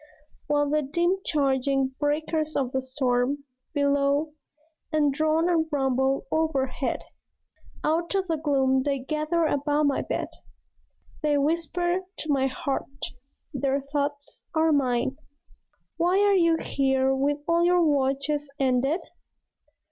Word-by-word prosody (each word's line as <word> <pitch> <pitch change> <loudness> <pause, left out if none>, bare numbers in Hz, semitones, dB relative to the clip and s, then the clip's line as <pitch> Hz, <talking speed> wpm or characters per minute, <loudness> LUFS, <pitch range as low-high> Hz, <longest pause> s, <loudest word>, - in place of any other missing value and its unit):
While 290 0 +2
the 305 0 +2
dim 345 +7 0
charging 270 -2 +1
breakers 310 +1 -1
of 260 -3 0
the 265 - -1
storm 260 +1 0 0.3
Bellow 285 +1 +2 0.6
and 295 -3 +2
drone 315 +3 +2
and 330 -2 +2
rumble 265 -1 +1
overhead, 275 -5 -1 0.8
Out 335 +4 0
of 385 -1 +1
the 325 -2 0
gloom 270 -3 +2
they 280 0 0
gather 310 +5 -1
about 290 0 +1
my 285 -2 +2
bed. - - -3 0.9
They 300 -2 +2
whisper 335 +4 0 0.2
to 310 - -3
my 270 -1 +2
heart; 270 +1 -3 0.7
their 275 0 0
thoughts 285 +1 -4
are 320 0 +3
mine. 260 -2 +1 0.8
"Why 350 +3 +2
are 410 0 +4
you 335 -3 +4
here 265 -1 +1
with 280 +2 +1
all 335 0 +3
your 350 -1 +4
watches 285 0 0
ended? 270 +5 +1
290 Hz, 125 wpm, -26 LUFS, 270-315 Hz, 0.9 s, are